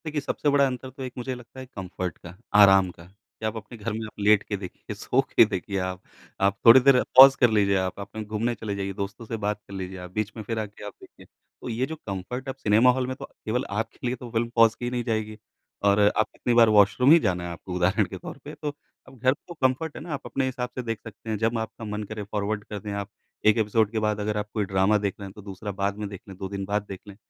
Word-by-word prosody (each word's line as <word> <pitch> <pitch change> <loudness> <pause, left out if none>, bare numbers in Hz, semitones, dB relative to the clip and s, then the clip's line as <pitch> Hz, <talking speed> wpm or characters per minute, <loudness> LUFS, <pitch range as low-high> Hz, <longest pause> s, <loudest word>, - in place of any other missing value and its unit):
देखिए, 150 -1 -2
सबसे 145 +1 -1
बड़ा 140 -1 +4
अंतर 130 0 -5
तो 130 +1 -9
एक 125 -1 -6
मुझे 125 +1 -3
लगता 125 +1 -12
है 130 - -7
कम्फ़र्ट 90 -2 -5
का, 85 +1 -12 0.2
आराम 95 -2 +7
का, 85 - -15
कि 100 +3 -13
आप 110 +1 -1
अपने 110 +2 -9
घर 110 +2 -4
में 110 0 -4
आप 105 - -12
लेट 105 0 +4
के 105 - -3
देखिए, 95 -2 -8
सो - - +1
के - - +5
देखिए 100 - -3
आप। 95 0 -3 0.4
आप 100 0 +2
थोड़ी 115 +3 +10
देर 130 -1 +5
पॉज़ 135 +1 +11
कर 120 -3 +5
लीजिए 100 -2 +3
आप, 95 +1 -2
आप 100 - -7
कहीं 110 -1 -5
घूमने 110 +3 -1
चले 105 -2 -4
जाइए, 100 0 -3
दोस्तों 100 +4 -5
से 115 - -4
बात 105 0 -1
कर 100 - -11
लीजिए 95 0 -5
आप, 90 0 -9
बीच 110 +2 -2
में 110 - -5
फिर 115 +2 -3
आके 105 -1 -7
आप 105 - -7
देखिए। - - -16
तो - - -13
ये 120 +3 0
जो 160 - -6
कम्फ़र्ट 100 +8 -5
अब 130 - -4
सिनेमा 115 0 +4
हॉल 125 0 -1
में 130 - -3
तो 135 - -8 0.2
केवल 125 +4 -1
आपके 115 +4 -3
लिए 125 - 0
तो 125 -1 -9
फ़िल्म 115 0 0
पॉज़ 115 -1 +6
की 120 - -2
नहीं 125 -1 -2
जाएगी, 110 -2 -2 0.5
और 100 0 +4 0.2
आप 110 - +2
कितनी 120 - -1
बार 115 -1 +6
वॉशरूम 105 +6 +5
ही 170 - +9
जाना 90 - 0
है 90 - -4
आपको, 90 +1 -8
उदाहरण 90 +1 +2
के - - -8
तौर - - -8
पे। - - -8
तो 150 -1 -4 0.3
अब 130 -1 -15
घर 130 +3 +3
तो 175 +4 -12
कम्फ़र्ट 140 +1 0
है - - -7
ना, 165 -2 -5
आप 140 - -4
अपने 135 -1 -1
हिसाब 125 -1 -3
से 125 - -2
देख 115 -3 -3
सकते 115 0 -10
हैं। 110 - 0
जब 115 +2 0
आपका 110 0 -6
मन 105 0 -4
करे, 105 +1 -6
फ़ॉरवर्ड 105 +1 -2
कर 105 -1 -6
दें 105 +1 -6
आप। 100 0 -4 0.4
एक 110 - +6
एपिसोड 110 -1 +2
के 115 - -1
बाद 105 -1 0
अगर 105 0 -1
आप 105 0 -3
कोई 105 -2 0
ड्रामा 95 +2 +3
देख 100 -2 -1
रहे 100 - -6
हैं, 95 - -11
तो 105 - -11
दूसरा 100 +1 -6
बाद 100 +1 0
में 105 -1 -4
देख 100 -1 -9
लें, 95 -2 -10
2 95 - -4
दिन 100 0 -4
बाद 105 +1 -1
देख 95 -1 -6
लें। 100 - -10
110 Hz, 275 wpm, -26 LUFS, 100-120 Hz, 0.5 s, पॉज़